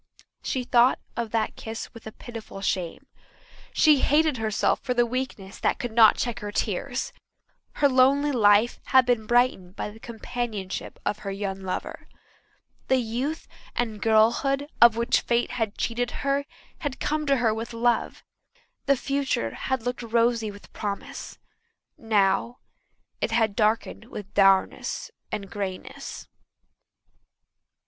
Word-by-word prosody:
She 255 - -2
thought 245 +1 +4 0.2
of 235 -1 -2
that 225 0 -1
kiss 225 0 -7
with 230 -2 -11
a - - -6
pitiful 225 -3 -9
shame. 185 -3 -2 0.7
She 300 -3 +5
hated 300 +1 +3
herself 220 -2 +1
for 250 -2 -2
the 240 0 +4
weakness 235 -6 -5
that - - +1
could 245 - -4
not 220 -1 +6
check 240 -3 -2
her 205 0 -5
tears. - - -2 0.6
Her 285 - +3
lonely 275 +2 +4
life 215 -2 +4
had 260 -1 +5
been 240 -3 +1
brightened 240 -7 +2
by 210 - -4
the 220 - -14
companionship 225 -4 -5
of 210 - -1
her 200 - -5
young 195 -1 -4
lover. 185 -1 -5 0.8
The 260 - +4
youth 255 +7 -3 0.3
and 220 -4 -2
girlhood 235 +6 +3
of 235 -1 +8
which 235 +2 +2
fate 235 0 0
had 225 -4 -2
cheated 245 +1 -1 0.2
her 280 0 +1 0.3
had 290 -4 -4
come 305 0 -1
to 280 - +4
her 230 -3 +2
with 225 +2 -5
love; 235 0 0 0.6
the 275 -1 +4
future 275 - -1
had 260 -3 -2
looked 245 +1 -3
rosy 230 -1 +1
with 205 0 -13
promise; 205 -2 -5 0.6
now 215 +2 +1 0.6
it - - +1
had 225 -3 +1
darkened 215 +1 0
with 210 -4 -9
dourness 195 -1 +2 0.2
and 200 -1 -4
greyness. 195 -2 -6
230 Hz, 140 wpm, -26 LUFS, 210-250 Hz, 0.8 s, of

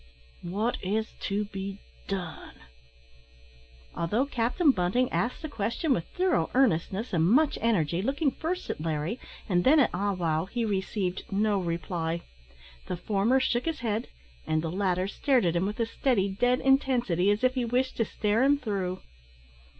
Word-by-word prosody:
What 205 +7 -2
is 215 +4 -1 0.2
to 205 +1 0
be 195 -1 -6 0.3
done?" 180 -5 -5 1.4
Although 210 +11 +1
Captain 275 +5 +2
Bunting 220 +5 +1
asked 245 +7 -1
the - - -2
question 235 +4 -1
with 170 - -2
thorough 365 -1 +2
earnestness 215 -2 +1
and 165 -2 +3
much 290 +6 +3
energy, 175 -7 +1
looking 275 - +1
first 350 +6 -3
at - - -6
Larry 160 +7 -2 0.3
and 175 -3 +2
then 300 +4 +6
at 270 - +4
Ah 200 +3 0
wow, 165 -3 0
he 235 +4 -2
received 190 0 -2
no 205 0 +2
reply. 170 -1 -2 0.7
The 180 - -3
former 210 +8 +2
shook 245 -2 0
his 325 -6 -2
head, 225 -1 -1 0.4
and 155 0 +1
the 165 - -2
latter 185 0 0
stared 255 +2 +2
at 170 0 +1
him 175 +3 +1
with 210 +3 -5
a 230 - +2
steady, 225 -4 +1
dead 245 +6 +1
intensity, 245 - +2
as 205 +3 +1
if 255 0 +4
he 255 -2 -1
wished 250 +2 0
to 230 - +2
stare 210 +2 0
him 280 +2 +4
through. 195 -7 -3
210 Hz, 165 wpm, -28 LUFS, 180-250 Hz, 1.4 s, then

